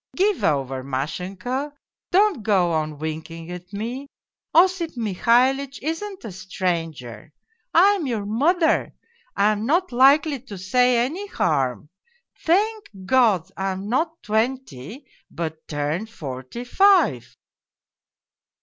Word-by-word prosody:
Give 395 0 +1
over, 135 -3 0
Mashenka, 185 - -4 0.4
don't 385 - +3
go 190 -5 +2
on 155 -2 -2
winking 160 +2 -6
at 180 +1 -9
me 235 +7 -5 0.4
Osip 345 -4 +3
Mihalitch 245 +6 +2
isn't 375 +6 -4
a 215 - -6
stranger! 165 - -4 0.4
I 365 +4 +6
am 380 -8 -1
your 220 -5 -2
mother, 315 - +1 0.4
I 210 +1 +3
am 215 +2 -2
not 350 +6 +1
likely 280 +3 +4
to 230 -5 -10
say 245 +7 +2
any 360 +10 -5
harm! 135 - -1 0.5
Thank 415 +5 +1 0.2
God, 200 -7 +3
I 195 0 -2
am 195 +2 -6
not 320 +7 -1
twenty, 220 - -2 0.2
but 160 -1 -6
turned 150 +8 -2
forty 135 - -7
five.' 330 - +3
220 Hz, 115 wpm, -23 LUFS, -, 0.5 s, I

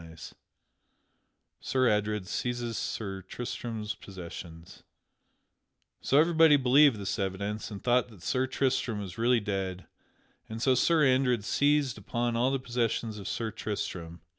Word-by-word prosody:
[Sidenote: 80 -1 -11 1.3
Sir 130 -1 +1
Adred 105 -2 0
seizes 120 +3 -3
Sir 95 -5 -4
Tristram's 110 +1 -5
possessions] 85 -3 -10 1.2
So 135 - +2
everybody 160 -2 +6
believed 135 +1 +5
this 100 - -3
evidence, 100 +2 -3
and 100 -3 -8
thought 125 0 +2
that 100 -6 -15
Sir 130 +1 0
Tristram 130 -4 0
was 95 -1 -7
really 120 +1 +3
dead, 95 -3 -3 0.6
and 110 +1 -5
so 130 +2 +3
Sir 155 +4 +3
Andred 130 -4 +2
seized 145 -2 +2
upon 120 +3 -2
all 120 +3 +2
the 135 - +1
possessions 115 -3 -2
of 100 - -7
Sir 115 -2 -2
Tristram. 90 -6 -5
115 Hz, 135 wpm, -29 LUFS, 100-130 Hz, 1.3 s, everybody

